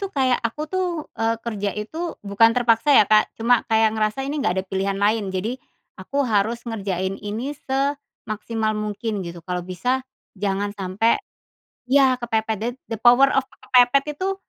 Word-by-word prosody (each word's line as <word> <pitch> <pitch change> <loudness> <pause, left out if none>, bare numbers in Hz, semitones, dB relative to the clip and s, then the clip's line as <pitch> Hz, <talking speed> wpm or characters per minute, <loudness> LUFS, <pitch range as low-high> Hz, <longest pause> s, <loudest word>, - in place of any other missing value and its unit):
tuh 395 - -3
kayak 260 -7 +1
aku 235 +6 -3
tuh, 375 0 +1 0.3
eee, 225 0 +1
kerja 205 -3 -2
itu 320 +11 -5
bukan 205 +3 +4
terpaksa 245 +3 +4
ya, - - +7
Kak, 215 +1 +4
cuma 235 +1 +3
kayak 220 -1 +3
ngerasa 215 +4 -1
ini 290 +2 -3
nggak 180 -9 +1
ada 190 - -1
pilihan 195 +1 -2
lain. 205 +1 +1
Jadi 210 +7 -3 0.4
aku 275 +9 -1
harus 225 +1 0
ngerjain 195 -4 -3
ini 220 +7 -4 0.2
semaksimal 235 -5 -2
mungkin 210 0 -3
gitu 170 -2 -8
kalau 180 -1 -2
bisa 185 +9 -1 0.3
jangan 200 0 -2
sampai 205 - 0 0.7
ya 260 -1 +4
kepepet 220 -2 -1
the 230 +3 -1 0.2
the 225 - -2
power 245 +4 +6
of 270 -1 +1 0.2
kepepet 250 +2 +4 0.2
itu 390 +1 -1
225 Hz, 160 wpm, -22 LUFS, 205-255 Hz, 0.7 s, ya